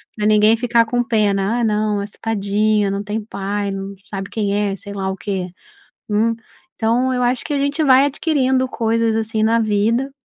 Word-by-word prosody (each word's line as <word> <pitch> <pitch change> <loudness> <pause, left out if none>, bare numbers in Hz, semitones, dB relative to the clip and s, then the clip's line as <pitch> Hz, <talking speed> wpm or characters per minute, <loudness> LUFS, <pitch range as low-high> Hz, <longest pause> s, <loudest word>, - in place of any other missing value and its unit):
pra 210 - -2
ninguém 215 +1 +5
ficar 235 -1 +2
com 245 +2 0
pena, 215 -1 +1
ah, - - 0
não, 215 -1 +1
nossa, 200 +1 -5
tadinha 210 -1 +1
não 200 +1 -3
tem 210 +1 -3
pai 200 -1 -3
não 195 0 -5
sabe 195 -1 -6
quem 205 -3 -1
é 205 -1 0
sei 200 +1 -9
lá 190 -1 -3
o 190 - -4
quê, 190 -2 -3 0.6
hum. 220 +2 +1 0.4
Então 240 +3 +1
eu 250 - -1
acho 245 0 0
que 300 - -3
a 285 - 0
gente 285 +3 0
vai 265 -1 +6
adquirindo 265 -3 +1
coisas 230 -2 0
assim 220 0 -1
na 225 +1 +3
vida 225 +5 +1
220 Hz, 195 wpm, -19 LUFS, 205-240 Hz, 0.6 s, vai